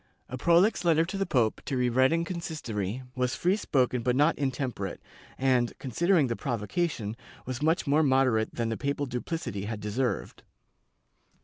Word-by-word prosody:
A 130 - -4
proUx 170 - +3
letter 165 -1 +4
to 185 - -6
the 195 -1 -1
pope, 120 -8 +1
to 135 - -2
be 125 0 +2
read 130 +3 +3
in 165 +1 +1
consis 170 -3 -5
tory, 105 +2 -3
was 125 -1 -1
free 180 +3 +2
spoken 130 - +1
but 125 +2 +1
not 150 +4 +4
intemperate 130 -8 -3 0.4
and, 125 -3 +1
considering 165 - +2
the 115 -2 -1
provocation, 115 - -2 0.3
was 130 +1 -4
much 160 +3 +2
more 145 +2 +3
moderate 130 -6 +2
than 115 -1 -1
the 115 - -2
papal 140 0 -1
duplicity 125 - -4
had 110 0 -4
deserved. 110 +5 -2
130 Hz, 170 wpm, -28 LUFS, 120-160 Hz, 0.4 s, letter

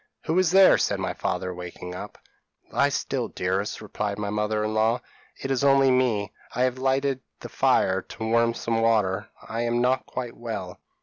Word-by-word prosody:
p> 160 - -1
"'Who 180 - +4
is 185 -3 +3
there?' 190 +2 +7
said - - 0
my - - -2
father, 90 0 -2
waking 90 0 -8
up. 90 - -8 0.5
"'Lie - - +3
still, - - -2
dearest,' 95 +4 -2
replied 105 0 -3
my 105 -1 -3
mother 105 0 0
in 110 0 -1
law; 110 +3 +2 0.4
'it 135 - -3
is 135 0 +1
only 135 -1 +5
me; 120 -6 +1 0.2
I 125 - +2
have 130 0 0
lighted 135 0 +1 0.2
the - - -7
fire 95 0 +2
to 110 - -9
warm 115 +1 +2
some 115 -1 -1
water; 105 -4 +1 0.2
I 115 +1 -3
am 120 0 0
not 125 +2 +1
quite 125 -2 -5
well.' 100 -6 -6
115 Hz, 190 wpm, -25 LUFS, 100-130 Hz, 0.5 s, there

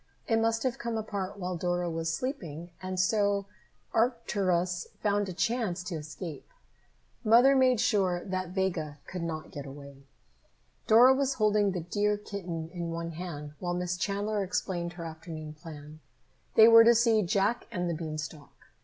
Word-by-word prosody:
It 225 -1 +3
must 225 0 +1
have 255 -2 -1
come 235 -1 -2
apart 205 -2 -4
while 180 -1 -3
Dora 175 +1 -1
was 165 -1 -2
sleeping, 170 - -4
and 185 0 -4
so 200 +1 +2 0.5
Arcturus 190 -7 0
found 205 -1 +1
a - - -3
chance 195 -1 -1
to 180 -1 -4
escape. 155 +1 -7 0.7
Mother 245 +5 +6
made 255 -3 +4
sure 190 -6 +1
that 185 -2 -3
Vega 180 -6 -2
could 180 - -6
not 160 -2 -4
get 140 -1 -7
away. 140 0 -12 0.8
Dora 245 +4 +8
was 270 0 0
holding 210 -2 +3
the 180 - -2
dear 205 +5 0
kitten 175 -6 -6
in 170 -2 -4
one 165 0 -4
hand 155 -3 -7
while 175 -1 -2
Miss 180 0 -1
Chandler 205 +2 -1
explained 175 -2 -2
her 170 -1 -7
afternoon 160 -1 -7
plan. 155 -1 -11 0.6
They 220 0 +9
were 230 0 +9
to 235 +1 +6
see 230 -1 +4
"Jack 200 +5 0
and 180 -5 -2
the 170 - -1
Beanstalk." 155 -2 -7
185 Hz, 160 wpm, -29 LUFS, 165-215 Hz, 0.8 s, They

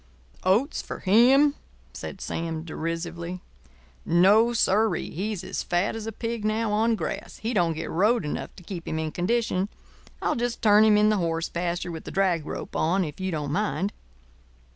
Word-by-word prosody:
"Oats 220 - +2
for - - -7
him?" 255 +9 +5 0.4
said - - -7
Sam, 165 -1 -3
derisively. 170 +2 -4 0.6
"No, 200 +7 +5
sir 220 -1 +2
ee. - - -5
He's 195 +2 -3
as - - -3
fat 180 +5 0
as 225 -1 -5
a - - -2
pig 230 0 -4
now 215 +1 0
on 225 +2 +2
grass. 170 -7 -5
He 225 +3 -3
don't 175 -6 +2
get 160 - -5
rode 210 +3 +2
enough 150 - -4
to 180 - -13
keep 170 -1 -7
him 160 - -2
in 160 -1 -2
condition. 200 +1 0 0.5
I'll - - 0
just 240 0 -2
turn 210 0 +6
him 215 -1 +5
in 210 0 +5
the 215 - +2
horse 165 -2 -1
pasture 175 0 -2
with 160 -1 -8
a - - -5
drag 180 -5 +1
rope - - -6
on 185 +4 +2
if 150 +2 -8
you 190 0 -2
don't 150 -4 -3
mind." 200 +2 -1
190 Hz, 185 wpm, -26 LUFS, 170-220 Hz, 0.6 s, turn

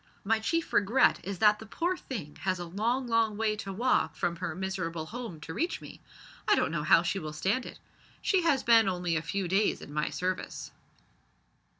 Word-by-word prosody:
My 220 +2 +2
chief 330 +9 -1
regret 210 +6 +4
is 195 0 -5
that 210 +2 +4
the 220 - -9
poor 345 - -1
thing 195 - -7
has 185 -1 -1
a 175 - -5
long 225 +9 -1
long 230 -3 +1
way 215 -1 +1
to 195 -2 -5
walk 195 -7 +1
from 170 +2 -1
her 160 - -4
miserable 180 -4 -3
home 225 -4 -7
to 160 - -7
reach 335 - -1
me. - - -12 0.5
I - - +6
don't - - +1
know 165 -2 -1
how 160 +2 +5
she 175 +3 -1
will 155 -3 -6
stand 195 +11 0
it. - - -10 0.4
She 380 -2 +2
has 295 -6 +2
been 225 -3 +6
only 180 -2 -1
a 160 - +1
few 185 +3 -2
days 195 +4 +2
in 145 - -10
my 150 0 0
service." 185 +1 -3
195 Hz, 205 wpm, -29 LUFS, 170-230 Hz, 0.5 s, I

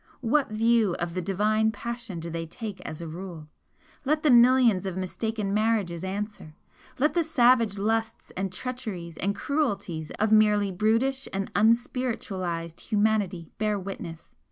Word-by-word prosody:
What 265 +4 +2
view 220 -3 +2
of 175 -1 -3
the 185 - -2
divine 215 +4 +1
passion 235 -3 -6
do 165 +1 -6
they 165 0 -4
take 210 +3 -7
as 155 - -7
a - - -6
rule? 165 -2 -8 0.5
Let 300 +3 +1
the 300 - +5
millions 240 -5 +5
of 190 -1 -4
mistaken 200 +2 -2
marriages 210 -6 0
answer! 195 -4 -5 0.4
Let 300 +4 +2
the 345 - +2
savage 245 -8 +3
lusts 225 +2 -1
and 190 0 -2
treacheries 195 -8 -5
and 200 +2 -1
cruelties 200 - -2
of 215 +1 +1
merely 210 -2 +4
brutish 230 +8 +1
and 195 0 -3
unspiritualised 210 - 0
humanity 205 -5 0
bear 215 -1 +1
witness? 180 -4 -7
210 Hz, 145 wpm, -27 LUFS, 185-235 Hz, 0.5 s, the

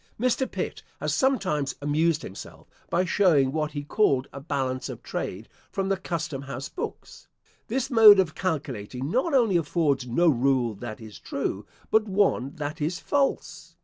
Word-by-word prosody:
Mr. 255 +2 +1
Pitt - - -4 0.2
has - - -1
sometimes 185 - +1
amused 155 +2 +1
himself, 95 - -10 0.2
by 180 +2 +1
showing 165 -9 +3
what 150 0 -2
he 145 -1 -4
called 145 -5 +2
a 140 - -6
balance 130 -3 -2
of - - -8
trade 100 +5 -5 0.2
from 195 -1 -2
the 195 - +2
custom 165 -5 -4
house 140 0 -6
books. - - -7 0.4
This 265 +4 -2
mode 220 -4 +9
of 170 -5 +1
calculating 135 - -3
not 270 +6 +1
only 225 -8 +4
affords 145 -5 0
no 170 +9 +2
rule 130 -4 +2
that 105 +1 -7
is 110 -2 -11
true, - - -4 0.2
but 220 0 +4
one 190 -8 +1
that 150 0 -5
is 165 +4 -1
false. 280 -1 -1
155 Hz, 160 wpm, -26 LUFS, 135-195 Hz, 0.4 s, mode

